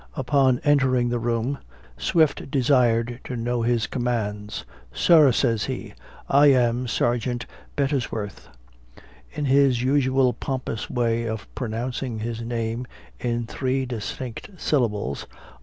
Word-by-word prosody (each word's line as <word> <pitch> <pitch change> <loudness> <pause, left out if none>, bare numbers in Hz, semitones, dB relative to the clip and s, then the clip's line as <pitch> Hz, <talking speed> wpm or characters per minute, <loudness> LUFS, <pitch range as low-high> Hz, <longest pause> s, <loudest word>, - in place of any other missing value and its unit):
Upon 130 -1 +2
entering 135 -4 +3
the 120 0 0
room, 120 +3 -1 0.4
Swift 155 - +1
desired 120 -3 +2
to 125 - -4
know 120 +1 -1
his 115 -1 +1
commands. 105 -4 -3 0.3
"Sir," 155 - +6
says 115 -5 +1
he, - - -5 0.3
"I 145 +2 +6
am 125 -2 +3
Sergeant 120 +2 0 0.3
Bet 140 -1 +1
tes 135 -5 -1
worth;" 105 -2 -6 0.8
in 150 - -3
his 135 -3 +4
usual 130 -1 +3
pompous 130 -4 -4
way 115 -1 0
of 110 -2 -4
pronouncing 120 +1 -3
his 115 +1 -4
name 115 +1 -3 0.3
in 120 -1 -1
three 130 +2 -1
distinct 120 - -5
syllables. 105 - -1
120 Hz, 125 wpm, -24 LUFS, 115-130 Hz, 0.8 s, Sir